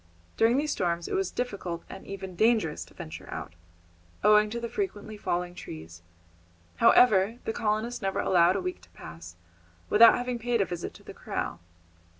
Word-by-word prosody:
During 230 +3 +3
these 300 +1 0
storms 170 -5 -1
it - - -5
was 190 -1 0
difficult 195 -8 -4
and 190 - -10
even 190 -2 -7
dangerous 215 -6 +2
to - - -20
venture 80 +2 -9
out, - - -6 0.7
owing 210 +1 +5
to 235 +2 -4
the 235 - -4
frequently 220 - -4
falling 180 -3 -2
trees; 80 - -10 0.8
however, 215 -1 +5
the 225 - -1
colonists 220 +3 -1
never 195 -1 -1
allowed 180 0 +4
a 195 - -1
week 180 - -4
to 85 - -19
pass 80 +2 -11 0.6
without 230 +2 +8
having 245 -1 -3
paid 235 0 0
a 195 - +3
visit 175 -2 -6
to - - -15
the - - -10
corral. - - -4
195 Hz, 170 wpm, -28 LUFS, 175-230 Hz, 0.8 s, without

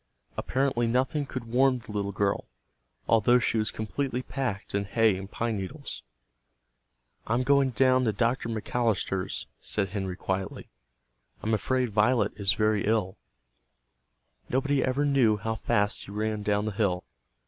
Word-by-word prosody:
Apparently 130 -3 0
nothing 130 +5 0
could 130 -2 -5
warm 130 +3 +3
the 120 -2 -10
little 100 -1 -2
girl, 100 +1 0 0.6
although 115 +2 +5
she 115 -1 +1
was 110 - +1
completely 125 +4 -3
packed 125 -9 -4
in 100 0 0
hay 110 0 +3
and 95 +1 -7
pine 115 0 -2
needles. 140 +10 -6 1.3
"I'm 115 +3 +1
going 140 0 +4
down 130 +1 +3
to 110 - +3
Dr. 115 +3 0
McAllister's," 110 -4 -1
said 100 -2 -1
Henry 95 -2 -3
quietly. 95 0 -4 0.7
"I'm 110 - 0
afraid 125 +2 +1
Violet 105 +1 +2
is 100 -1 +2
very 105 -1 +1
ill." 105 -3 0 1.3
Nobody 135 +1 +1
ever 135 +3 +1
knew 130 -7 +3
how 110 +2 -2
fast 105 -1 0
he - - -13
ran 105 0 -2
down 105 0 +1
the 110 - -1
hill. 95 -4 0
110 Hz, 145 wpm, -28 LUFS, 100-130 Hz, 1.3 s, although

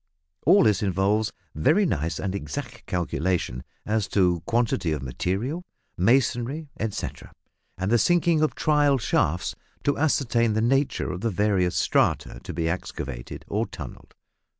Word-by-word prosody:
All 200 - +7
this 105 -3 +3
involves 100 +2 +1 0.2
very 135 - +3
nice 80 - -1
and 95 -1 -2
exact 120 +5 -6
calculation 85 - -1 0.2
as 110 -1 0
to 90 -4 +2
quantity 110 -8 +1
of 75 -3 -4
material, 100 - -2 0.3
masonry, 130 - +1
etcetera, 110 -2 -4 0.5
and 95 +3 -1
the 120 - +5
sinking 170 0 +3
of 155 - +1
"trial 145 -2 +3
shafts" 90 - 0 0.3
to 145 - +1
ascertain 120 -7 +2
the 110 - +1
nature 135 -3 +1
of 90 0 -5
the 115 - +1
various 100 -3 +1
strata - - +1
to - - -7
be 80 0 -1
excavated 70 -7 -5
or - - -1
tunnelled. - - -10
105 Hz, 140 wpm, -25 LUFS, 90-135 Hz, 0.5 s, All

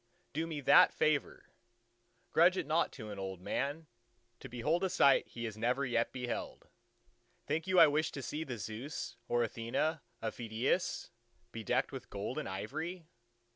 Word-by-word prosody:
Do 160 +3 -1
me 155 -3 -4
that - - +7
favour! 155 -2 0 0.8
Grudge 175 +3 +5
it 180 - -1
not 160 +3 +2
to 110 -1 -8
an 100 - -6
old 95 -1 -5
man, 145 - -2 0.5
to 135 - -9
behold 150 +10 0
a 190 - +2
sight 140 -7 +5
he 120 - -7
has 110 -1 -6
never 125 +4 +1
yet 120 -2 +1
beheld. 125 -2 -5 0.8
Think 160 +4 -1
you 185 -1 +4
I - - +11
wish 155 +1 +1
to 140 - -5
see 150 +6 -3
the 130 -6 -5
Zeus 115 +8 -5
or 120 0 +2
Athena 120 +8 -1 0.2
of 110 - -3
Phidias, 115 +1 -1 0.4
bedecked - - 0
with - - -8
gold - - -3
and - - -4
ivory? 155 - -4
135 Hz, 165 wpm, -34 LUFS, 115-160 Hz, 0.8 s, I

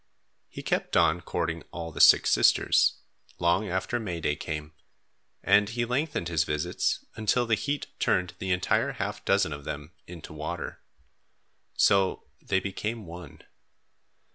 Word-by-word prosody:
He - - -9
kept - - 0
on, 85 - +3
courting 80 0 -3
all 85 -1 -6
the 75 - -2
six - - +7
sisters, - - +4 0.4
long 85 +4 +1
after 95 +7 -1
May 90 -7 -4
day 75 -2 0
came, 75 0 -6 0.7
and 100 +1 +4
he 120 +1 -1
lengthened 125 - -1
his 80 -2 +1
visits 75 0 -1
until 110 +3 +1
the 115 - 0
heat 130 +7 -1
turned 90 0 +1
the 95 0 -2
entire 90 0 +1
half - - -4
dozen 80 - +2
of 70 0 -8
them 75 +3 -6 0.2
into 85 -3 -10
water. 80 +3 -5 0.9
So 95 -1 +3 0.2
they 95 - +1
became 105 +3 -4
one. 85 -3 -11
90 Hz, 140 wpm, -27 LUFS, 80-105 Hz, 0.9 s, six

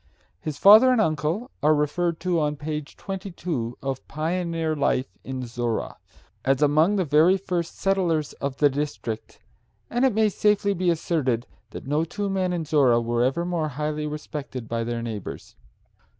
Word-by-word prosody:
His 145 +8 -5
father 215 - +8
and 250 - +3
uncle 160 - 0
are 155 +1 +4
referred 160 +3 0
to 180 -2 +1
on 150 -1 0
page 150 0 -5
22 175 - -4
of 135 -1 -4
"Pioneer 165 0 -1
Life 135 -2 0
in 130 -1 -5
Zorra," 120 -1 -3 0.5
as 135 +2 +2
among 155 +7 +4
the 190 -3 +1
very 160 +6 +5
first 180 -3 -3
settlers 175 -6 0
of 140 -1 -3
the 145 - +5
district, 140 -6 -4 0.5
and 245 +2 +1
it 260 -6 +3
may 220 -1 +4
safely 205 0 +2
be 185 -1 0
asserted 145 -8 0 0.2
that - - -9
no 150 +4 +1
two 200 +4 -3
men 185 -1 0
in 170 -3 -2
Zorra 135 -6 +4
were 120 +1 0
ever 135 +7 0
more 170 -3 -1
highly 150 +2 -3
respected 150 -5 -6
by 115 0 -2
their 115 0 -3
neighbors. 110 -4 -7
155 Hz, 165 wpm, -25 LUFS, 135-180 Hz, 0.5 s, father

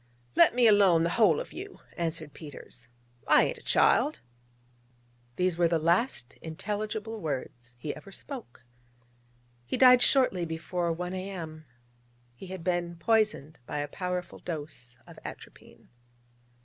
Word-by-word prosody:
'Let - - +6
me 245 -1 +4
alone, 200 -6 +6
the 170 - +1
whole 195 -9 +4
of - - -7
you,' 390 +2 -8 0.2
answered 160 -3 -3
Peters: 135 -5 -10 0.4
'I - - +6
ain't - - -2
a - - -17
child.' 305 -8 +3 1.2
These 180 +1 0
were 170 - +5
the 165 0 +2
last 170 - 0
intelligible 210 +6 -4
words 125 -5 -5
he 145 +5 -5
ever 175 +6 -12
spoke. 225 - -9 1.0
He 120 - -3
died 250 -1 +8
shortly 250 -12 +3
before 170 +1 -2
1 180 +2 -4
A.M. 175 -5 -6 0.7
He 155 +10 -11
had 185 -2 -7
been 175 -1 -1
poisoned 210 -5 +1
by - - -4
a 145 0 -2
powerful 180 +2 -4
dose 145 -7 -7
of - - -13
atropine. - - -12
175 Hz, 135 wpm, -29 LUFS, 155-210 Hz, 1.2 s, died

